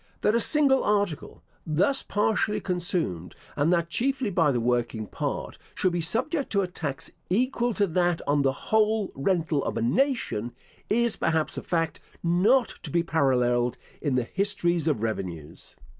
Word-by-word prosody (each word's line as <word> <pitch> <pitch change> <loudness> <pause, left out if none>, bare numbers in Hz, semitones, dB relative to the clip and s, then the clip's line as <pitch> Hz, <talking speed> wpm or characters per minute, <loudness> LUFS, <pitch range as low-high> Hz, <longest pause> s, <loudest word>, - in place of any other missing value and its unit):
That 210 - +3
a 235 - +3
single 280 -2 +4
article, 205 -6 -1 0.2
thus 180 - +2
partially 210 +1 0
consumed, 175 - -3 0.2
and 145 +4 +2
that 170 -1 +1
chiefly 265 -1 -1
by 165 -5 +3
the 125 - 0
working 120 -2 -1
part, - - -4 0.2
should 185 - +1
be 175 0 -1
subject 265 - -1
to 200 -1 +2
a - - -2
tax, 150 -6 -5 0.2
equal 240 +4 +1
to 205 - +3
that 175 -1 +1
on 145 0 +2
the 135 -1 +2
whole 215 +7 +1
rental 160 -1 0
of - - -3
a - - -1
nation, 125 - 0 0.4
is, 235 +1 +2
perhaps, 160 -1 0
a - - -4
fact 165 -2 -1 0.2
not 200 +10 +3
to - - -7
be 170 0 +1
paralleled 125 -6 +1 0.2
in 145 -4 0
the 125 - +2
histories 175 - 0
of 140 -9 0
revenues. 95 -8 -5
170 Hz, 160 wpm, -26 LUFS, 140-210 Hz, 0.4 s, single